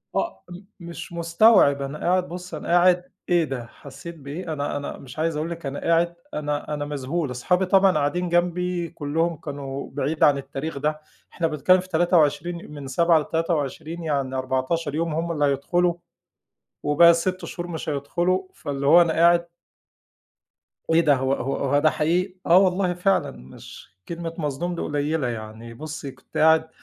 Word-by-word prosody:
آه 95 Hz, 0 st, -2 dB
م 175 Hz, 0 st, -9 dB, 0.2 s
مش 170 Hz, 0 st, -8 dB
مستوعب، 170 Hz, -3 st, +4 dB
أنا 140 Hz, +2 st, -4 dB
قاعد 180 Hz, +1 st, +1 dB
بُصي 180 Hz, -2 st, -7 dB
أنا -, -, -8 dB
قاعد، 180 Hz, +1 st, +3 dB, 0.2 s
إيه 175 Hz, -1 st, +4 dB
ده 135 Hz, -6 st, -4 dB
حسيت 140 Hz, +7 st, -11 dB
بإيه؟ 160 Hz, +3 st, -6 dB
أنا 145 Hz, -1 st, -2 dB
أنا 145 Hz, -, -6 dB
مش 135 Hz, +2 st, -11 dB
عايز 160 Hz, 0 st, 0 dB
أقول 155 Hz, +2 st, -2 dB
لِك 170 Hz, -2 st, -7 dB
أنا 135 Hz, +1 st, -4 dB
قاعد 170 Hz, +1 st, +1 dB, 0.2 s
أنا 150 Hz, 0 st, -3 dB
أنا 145 Hz, -1 st, -3 dB
مذهول، 145 Hz, +1 st, -3 dB
أصحابي 180 Hz, +10 st, +1 dB
طبعًا 195 Hz, +1 st, +5 dB
قاعدين 175 Hz, +5 st, 0 dB
جنبي 175 Hz, 0 st, 0 dB
كلهم 165 Hz, +4 st, -1 dB
كانوا 140 Hz, -2 st, -6 dB
بعيد 145 Hz, +3 st, -1 dB
عن 145 Hz, -1 st, +5 dB
التاريخ 140 Hz, +2 st, -5 dB
ده. 150 Hz, +2 st, -2 dB, 0.3 s
إحنا 170 Hz, -, 0 dB
بنتكلم 160 Hz, +4 st, +3 dB
في 185 Hz, +1 st, -8 dB
23 170 Hz, -1 st, +1 dB
من 145 Hz, -2 st, -8 dB
7 170 Hz, +4 st, +3 dB
ل23 160 Hz, +1 st, -2 dB
يعني 140 Hz, -4 st, -1 dB
14 130 Hz, +4 st, -1 dB
يوم 165 Hz, 0 st, -1 dB
هم 165 Hz, +2 st, -2 dB
اللي 150 Hz, -3 st, +1 dB
هيدخلوا. 170 Hz, +6 st, +1 dB, 0.9 s
وباقي 150 Hz, +4 st, +6 dB
ال6 180 Hz, +2 st, 0 dB
شهور 175 Hz, -1 st, -6 dB
مش 165 Hz, -2 st, -6 dB
هيدخلوا، 175 Hz, +6 st, -1 dB
فاللي 140 Hz, -2 st, -4 dB
هو 165 Hz, +5 st, +8 dB
أنا 165 Hz, -1 st, +1 dB
قاعد 170 Hz, +1 st, +4 dB, 1.4 s
إيه 165 Hz, +1 st, +5 dB
ده! 150 Hz, -4 st, +4 dB
هو 130 Hz, +1 st, 0 dB
هو 135 Hz, 0 st, -2 dB
هو 140 Hz, +1 st, +1 dB
ده 155 Hz, +1 st, +4 dB
حقيقي؟ 180 Hz, +5 st, 0 dB
آه 170 Hz, -, +6 dB
والله 185 Hz, -1 st, +3 dB
فعلًا 185 Hz, +2 st, +1 dB
مش 65 Hz, +8 st, -13 dB
كلمة 170 Hz, -1 st, -5 dB
مصدوم 165 Hz, +3 st, -3 dB
دي -, -, -4 dB
قليلة 145 Hz, -1 st, -1 dB
يعني، 115 Hz, 0 st, -7 dB
بُصي 150 Hz, +2 st, -7 dB
كنت -, -, -11 dB
قاعد 160 Hz, 0 st, +4 dB
160 Hz, 170 wpm, -24 LUFS, 145-175 Hz, 1.4 s, هو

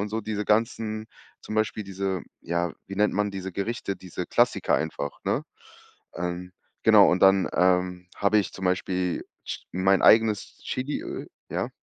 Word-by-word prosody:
und 105 Hz, -, -2 dB
so 110 Hz, +1 st, -1 dB
diese 105 Hz, 0 st, -3 dB
ganzen 110 Hz, 0 st, 0 dB, 0.4 s
zum 110 Hz, -, -6 dB
Beispiel 110 Hz, 0 st, 0 dB
diese 95 Hz, -1 st, -3 dB, 0.2 s
ja, 85 Hz, 0 st, -1 dB
wie 100 Hz, -, -7 dB
nennt 105 Hz, +1 st, +3 dB
man 105 Hz, 0 st, +1 dB
diese 95 Hz, -1 st, -5 dB
Gerichte, 100 Hz, +1 st, -3 dB
diese 90 Hz, -1 st, -6 dB
Klassiker -, -, +2 dB
einfach, 75 Hz, -2 st, -3 dB
ne? -, -, 0 dB, 0.7 s
Ähm, 90 Hz, +1 st, -4 dB, 0.3 s
genau, -, -, +7 dB
und 90 Hz, -, +1 dB
dann, 95 Hz, 0 st, +6 dB
ähm, 90 Hz, 0 st, +2 dB
habe 105 Hz, +1 st, +3 dB
ich 100 Hz, -, -1 dB
zum 95 Hz, -, -6 dB
Beispiel 90 Hz, -1 st, -1 dB, 0.2 s
Ch -, -, -5 dB
mein 95 Hz, +2 st, +3 dB
eigenes 110 Hz, -2 st, +4 dB
Chiliöl 315 Hz, -, -4 dB, 0.2 s
ja? -, -, -1 dB
95 Hz, 155 wpm, -26 LUFS, 90-110 Hz, 0.7 s, genau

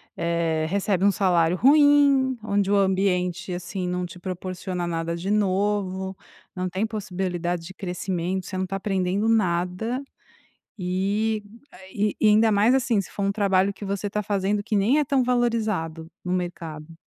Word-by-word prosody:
eh, 170 Hz, -2 st, 0 dB
recebe 195 Hz, 0 st, 0 dB
um 200 Hz, -, +6 dB
salário 175 Hz, -3 st, +2 dB
ruim, 280 Hz, -, +5 dB
onde 200 Hz, -2 st, 0 dB
o -, -, +4 dB
ambiente, 190 Hz, -1 st, +1 dB
assim, 180 Hz, +1 st, -4 dB
não 180 Hz, 0 st, -2 dB
te 180 Hz, +1 st, -10 dB
proporciona 185 Hz, 0 st, -4 dB
nada 165 Hz, 0 st, -2 dB
de 175 Hz, +3 st, -4 dB
novo, 195 Hz, -1 st, 0 dB, 0.4 s
não 185 Hz, 0 st, -2 dB
tem 190 Hz, +5 st, -1 dB
possibilidade 180 Hz, -5 st, -3 dB
de 190 Hz, -, -9 dB
crescimento, 185 Hz, -1 st, -3 dB
você 190 Hz, -, -5 dB
não 185 Hz, -, 0 dB
está 195 Hz, +1 st, -4 dB
aprendendo 195 Hz, +1 st, 0 dB
nada 200 Hz, +3 st, 0 dB, 0.8 s
e 200 Hz, +4 st, 0 dB, 0.3 s
a -, -, -14 dB
e 205 Hz, +1 st, -1 dB
e 215 Hz, -, +5 dB
ainda 220 Hz, +1 st, +5 dB
mais, 215 Hz, +4 st, +4 dB
assim, 240 Hz, -5 st, +2 dB
se 195 Hz, -, -8 dB
for 200 Hz, -, -5 dB
um 200 Hz, -, +1 dB
trabalho 200 Hz, -1 st, +2 dB
que 205 Hz, -, -9 dB
você 200 Hz, +1 st, -2 dB
está 210 Hz, +1 st, -2 dB
fazendo 205 Hz, 0 st, 0 dB
que 220 Hz, -1 st, -1 dB
nem 220 Hz, +9 st, +3 dB
é 300 Hz, -, +2 dB
tão 275 Hz, -1 st, +2 dB
valorizado 220 Hz, -10 st, -1 dB
no 180 Hz, -, -2 dB
mercado. 165 Hz, -3 st, -4 dB
190 Hz, 165 wpm, -24 LUFS, 180-210 Hz, 0.8 s, um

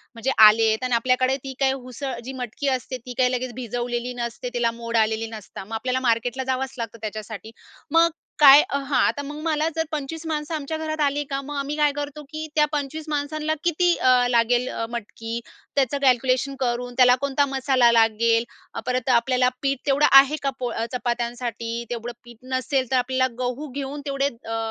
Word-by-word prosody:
म्हणजे 230 Hz, +4 st, -1 dB, 0.2 s
आलेत 220 Hz, +2 st, +2 dB
आणि 250 Hz, -1 st, +1 dB
आपल्याकडे 255 Hz, +2 st, +2 dB
ती 270 Hz, -1 st, -6 dB
काय 270 Hz, -1 st, +3 dB
उसळ 265 Hz, +1 st, -6 dB
जी 265 Hz, -, -6 dB
मटकी 245 Hz, +4 st, -5 dB
असते, 255 Hz, +1 st, -7 dB
ती 250 Hz, -, -6 dB
काय 250 Hz, -1 st, +4 dB
लगेच 250 Hz, 0 st, -3 dB
भिजवलेली 240 Hz, 0 st, -3 dB
नसते, 235 Hz, +2 st, -5 dB
तिला 235 Hz, -1 st, +1 dB
मोड 230 Hz, 0 st, -1 dB
आलेली 220 Hz, 0 st, +1 dB
नसता, 215 Hz, -3 st, -9 dB
मग 220 Hz, -, -10 dB
आपल्याला 255 Hz, +3 st, -1 dB
मार्केटला 240 Hz, +3 st, 0 dB
जावंच 265 Hz, +1 st, -4 dB
लागतं 230 Hz, -1 st, -5 dB
त्याच्यासाठी. 215 Hz, 0 st, -6 dB, 0.4 s
मग, 330 Hz, +1 st, +5 dB, 0.3 s
काय 285 Hz, -1 st, +10 dB
अ, 280 Hz, -, 0 dB
हां, 275 Hz, -2 st, 0 dB
आता 235 Hz, +5 st, -1 dB
मग 295 Hz, +1 st, -7 dB
मला 310 Hz, -1 st, +1 dB
जर 320 Hz, -, +1 dB
25 310 Hz, +2 st, -5 dB
माणसं 305 Hz, 0 st, -3 dB
आमच्या 310 Hz, +1 st, -4 dB
घरात 310 Hz, 0 st, -3 dB
आली 285 Hz, +1 st, 0 dB
का, 275 Hz, 0 st, -1 dB
मग 290 Hz, +2 st, -7 dB
आम्ही 280 Hz, +1 st, -2 dB
काय 295 Hz, -1 st, +3 dB
करतो, 290 Hz, +1 st, -5 dB
की 310 Hz, 0 st, -5 dB
त्या 300 Hz, -1 st, +5 dB
25 295 Hz, +1 st, -3 dB
माणसांना 305 Hz, +1 st, -1 dB
किती 345 Hz, +1 st, +3 dB
अ 255 Hz, 0 st, +4 dB
लागेल 240 Hz, +1 st, +2 dB
अ, 230 Hz, -, -3 dB
मटकी, 230 Hz, 0 st, -5 dB, 0.4 s
त्याचं 275 Hz, 0 st, +1 dB
कॅल्क्युलेशन 260 Hz, +1 st, +2 dB
करून, 245 Hz, -1 st, -2 dB
त्याला 250 Hz, -1 st, +7 dB
कोणता 280 Hz, 0 st, +1 dB
मसाला 265 Hz, -3 st, +3 dB
लागेल, 230 Hz, 0 st, +3 dB, 0.3 s
अ, -, -, -2 dB
परत 255 Hz, 0 st, -1 dB
आपल्याला 250 Hz, +1 st, +3 dB
पीठ 275 Hz, -1 st, 0 dB
तेवढं 285 Hz, +2 st, +4 dB
आहे 275 Hz, +2 st, +7 dB
का, 275 Hz, -, +2 dB
पोळ 245 Hz, -2 st, -2 dB, 0.2 s
चपात्यांसाठी? 235 Hz, -1 st, -3 dB
तेवढं 240 Hz, 0 st, -4 dB
पीठ 240 Hz, -2 st, -14 dB, 0.2 s
नसेल, 260 Hz, 0 st, 0 dB
तर -, -, +3 dB
आपल्याला 260 Hz, +1 st, +1 dB
गहू 250 Hz, +4 st, -3 dB
घेऊन 280 Hz, +1 st, -4 dB
तेवढे 275 Hz, -1 st, 0 dB, 0.2 s
अ 225 Hz, -, -1 dB
255 Hz, 185 wpm, -23 LUFS, 235-280 Hz, 0.4 s, काय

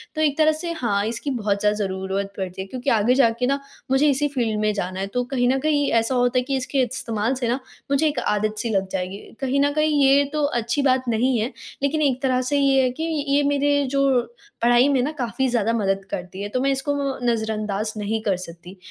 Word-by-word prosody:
तो 310 Hz, -, -1 dB
एक 290 Hz, -2 st, +2 dB
तरह 310 Hz, 0 st, +5 dB
से 320 Hz, +2 st, -4 dB
हाँ 205 Hz, -7 st, 0 dB
इसकी 235 Hz, +5 st, -4 dB
बहुत 210 Hz, -5 st, -1 dB
ज़्यादा 210 Hz, +1 st, +2 dB
ज़रूरत 195 Hz, 0 st, -3 dB
पड़ती 190 Hz, -1 st, -4 dB
है 190 Hz, -, -7 dB
क्योंकि 255 Hz, +5 st, -3 dB
आगे 225 Hz, +2 st, +3 dB
जाके 235 Hz, -2 st, +3 dB
ना 275 Hz, +2 st, +1 dB, 0.3 s
मुझे 275 Hz, +3 st, +4 dB
इसी 285 Hz, +1 st, +1 dB
फ़ील्ड 235 Hz, -6 st, -1 dB
में 215 Hz, 0 st, +2 dB
जाना 185 Hz, -2 st, -3 dB
है 195 Hz, -, -2 dB
तो 245 Hz, -, +1 dB
कहीं 245 Hz, -2 st, +2 dB
न 265 Hz, -, +2 dB
कहीं 290 Hz, 0 st, +1 dB
ऐसा 230 Hz, +3 st, +2 dB
होता 245 Hz, 0 st, +2 dB
है -, -, -1 dB
कि 270 Hz, +2 st, -2 dB
इसके 265 Hz, +1 st, -1 dB
इस्तेमाल 230 Hz, -1 st, -2 dB
से 250 Hz, -2 st, -2 dB
ना 245 Hz, +3 st, 0 dB, 0.3 s
मुझे 280 Hz, +3 st, +3 dB
एक 290 Hz, -4 st, -1 dB
आदत-सी 215 Hz, +2 st, -1 dB
लग 195 Hz, -3 st, 0 dB
जाएगी। 185 Hz, +1 st, -3 dB, 0.2 s
कहीं 270 Hz, +1 st, 0 dB
न 285 Hz, 0 st, +3 dB
कहीं 305 Hz, -1 st, +2 dB
ये 275 Hz, +1 st, +5 dB
तो 305 Hz, -1 st, 0 dB
अच्छी 240 Hz, -1 st, 0 dB
बात 260 Hz, -2 st, +2 dB
नहीं 240 Hz, +3 st, +2 dB
है, 225 Hz, +5 st, -1 dB, 0.3 s
लेकिन 295 Hz, +2 st, +1 dB
एक 265 Hz, -4 st, +1 dB
तरह 255 Hz, -1 st, +1 dB
से 285 Hz, -, +3 dB
ये 270 Hz, -1 st, +4 dB
है 255 Hz, -, +2 dB
कि, 315 Hz, +6 st, -5 dB, 0.2 s
ये 280 Hz, +1 st, +3 dB
मेरे 285 Hz, 0 st, +2 dB
जो 275 Hz, -2 st, +3 dB, 0.4 s
पढ़ाई 240 Hz, +2 st, +5 dB
में 270 Hz, -3 st, +2 dB
ना 290 Hz, -, -1 dB
काफ़ी 260 Hz, -2 st, -2 dB
ज़्यादा 230 Hz, -2 st, +1 dB
मदद 195 Hz, -3 st, 0 dB
करती 180 Hz, +2 st, -6 dB
है, 205 Hz, -, -4 dB
तो 255 Hz, -, -1 dB
मैं 275 Hz, +1 st, +2 dB
इसको 270 Hz, +2 st, -1 dB, 0.4 s
नज़रअंदाज़ 215 Hz, -1 st, -2 dB
नहीं 215 Hz, +1 st, -2 dB
कर 200 Hz, -3 st, +1 dB
सकती। 175 Hz, +1 st, -10 dB
245 Hz, 230 wpm, -23 LUFS, 210-275 Hz, 0.4 s, तरह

